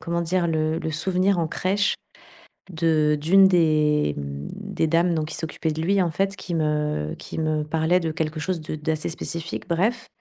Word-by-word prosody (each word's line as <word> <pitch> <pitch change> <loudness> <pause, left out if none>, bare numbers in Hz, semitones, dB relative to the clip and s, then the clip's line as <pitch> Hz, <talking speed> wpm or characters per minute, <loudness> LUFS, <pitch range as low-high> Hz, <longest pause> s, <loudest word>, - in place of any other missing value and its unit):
comment 170 0 -2
dire, 170 +1 +1
le 160 0 0
le 160 - -3
souvenir 185 +4 +1
en 165 - +1
crèche 200 +4 0 0.8
de 155 -2 +2
d'une 190 +6 +6
des 155 - +3
mmh, 70 0 -5
des 195 -5 -2
dames, 170 +2 +2
donc 155 -2 0
qui - - -5
s'occupait 160 0 -3
de 155 - -5
lui 195 +3 +2
en 175 - +1
fait, 195 +5 -1
qui 175 -3 -5
me 150 - 0
qui - - -8
me 155 -1 0
parlait 160 +3 +1
de 165 -2 -2
quelque 155 0 -3
chose 180 +1 -2
de 155 - -6
d'assez 155 +1 -2
spécifique. 165 +1 -5
Bref! 210 +8 0
160 Hz, 190 wpm, -24 LUFS, 155-180 Hz, 0.8 s, d'une